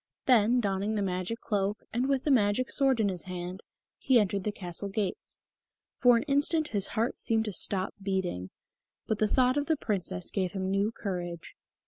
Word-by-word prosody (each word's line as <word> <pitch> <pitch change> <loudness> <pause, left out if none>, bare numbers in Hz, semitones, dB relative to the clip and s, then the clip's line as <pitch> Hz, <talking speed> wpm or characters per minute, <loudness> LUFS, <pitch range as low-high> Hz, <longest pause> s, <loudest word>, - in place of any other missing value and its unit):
Then, 245 -1 +4
donning 200 0 -1
the 205 - 0
magic 185 +4 -3
cloak, 205 -1 -1
and 250 +4 0
with 270 -2 +1
the 295 - +1
magic 230 0 +2
sword 270 -3 +3
in 215 - +3
his 185 -3 -3
hand, 180 0 -6 0.4
he 255 -3 +4
entered 200 -2 0
the 210 - 0
castle 190 0 -5
gates. 195 -2 -3 0.6
For 245 -1 +6
an - - -1
instant 300 +2 +1
his 200 -2 0
heart 230 +3 0
seemed 225 -1 +1
to 210 - -3
stop 190 +1 -1
beating, 190 - -2 0.6
but 215 - -1
the 215 - +3
thought 255 +4 +3
of 290 - 0
the 320 -2 +2
Princess 185 - -2
gave 185 -3 -1
him 190 -1 -2
new 200 +3 +1
courage.... 175 -6 -5
205 Hz, 185 wpm, -29 LUFS, 190-245 Hz, 0.6 s, For